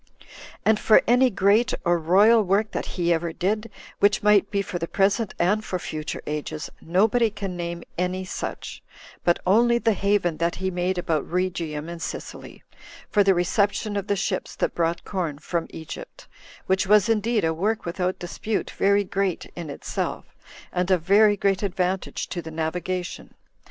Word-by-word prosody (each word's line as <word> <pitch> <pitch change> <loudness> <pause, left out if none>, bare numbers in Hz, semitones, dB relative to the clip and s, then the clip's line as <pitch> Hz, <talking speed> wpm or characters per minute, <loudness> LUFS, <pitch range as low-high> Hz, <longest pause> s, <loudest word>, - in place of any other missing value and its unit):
And 220 -1 +4
for 215 - +5
any 250 +2 +4
great 205 +4 +3
or 175 0 +3
royal 205 +8 +5
work 205 +2 +1
that - - -3
he 175 -1 +2
ever 165 0 -1
did, 215 +7 -1 0.3
which 205 +1 +3
might 210 -2 +4
be 200 -1 0
for 185 -2 -5
the 165 - -3
present 200 +3 +1
and 205 +5 +2
for 185 - -3
future 155 -3 -5
ages, 150 0 -4
nobody 220 +7 +2
can 195 -3 -5
name 170 -1 -4 0.2
any 185 +1 -1
such, 185 - -6 0.4
but 175 - +3
only 235 +5 +4
the 225 -2 +2
haven 200 -5 +1
that 170 +2 0
he 190 0 -2
made 180 +1 -1
about 160 -4 -1
Rhegium 170 -4 -2
and 170 -1 -7
Sicily, - - -7 0.5
for 205 - +4
the 195 -1 +4
reception 200 +4 0
of 200 -1 -2
the 200 - +1
ships 195 -1 -2
that - - -1
brought 170 0 -1
corn 170 -7 -3
from 165 +2 -3
Egypt; 165 - -9 0.4
which 190 0 +1
was 210 0 +5
indeed 225 -1 +1
a 160 - +1
work 210 +7 -1
without 180 +2 -2
dispute 200 +4 -3
very 200 +1 +2
great 195 -2 -2
in 170 -3 -6
itself, 140 - -4 0.5
and 180 0 0
of 180 -4 +2
very 205 +3 +5
great 195 -1 +1
advantage 185 -1 -2
to 175 - -4
the 160 - -8
navigation. 175 +3 -4
185 Hz, 170 wpm, -24 LUFS, 170-205 Hz, 0.5 s, for